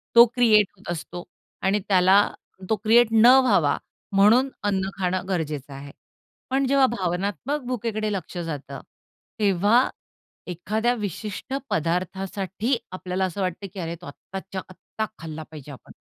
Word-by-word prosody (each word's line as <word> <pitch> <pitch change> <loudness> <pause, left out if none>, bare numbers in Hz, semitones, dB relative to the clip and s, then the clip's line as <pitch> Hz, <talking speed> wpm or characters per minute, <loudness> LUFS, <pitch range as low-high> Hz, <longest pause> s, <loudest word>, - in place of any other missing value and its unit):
तो 235 +1 +10
क्रिएट 215 -5 +5
होत 180 -2 -7
असतो 175 +1 -6 0.4
आणि 195 +2 +2
त्याला 190 -1 +5 0.5
तो 220 - +3
क्रिएट 235 +2 +6
न 225 +1 +5 0.2
व्हावा 170 - +3 0.4
म्हणून 230 +7 +5
अन्न 195 -2 0
खाणं 185 0 -1
गरजेचं 150 -6 -3
आहे. 140 +1 -9 0.6
पण 270 +1 +1
जेव्हा 275 0 +4
भावनात्मक 200 - -2
भुकेकडे 220 -3 -2
लक्ष 180 -1 -5
जातं, 160 -5 -5 0.6
तेव्हा 205 +5 +3 0.6
एखाद्या 215 +7 -1
विशिष्ट 210 - -5 0.2
पदार्थासाठी 190 - -1
आपल्याला 185 0 -2
असं 185 +2 -4
वाटत, 185 +2 -3
की 195 - -7
"अरे 170 0 -4
तो, - - -11
आत्ताच्या 190 +5 -7
आत्ता 215 +3 -5
खाल्ला 160 -1 -7
पाहिजे 150 -2 -10
आपण." 130 - -13
195 Hz, 135 wpm, -24 LUFS, 175-220 Hz, 0.6 s, तो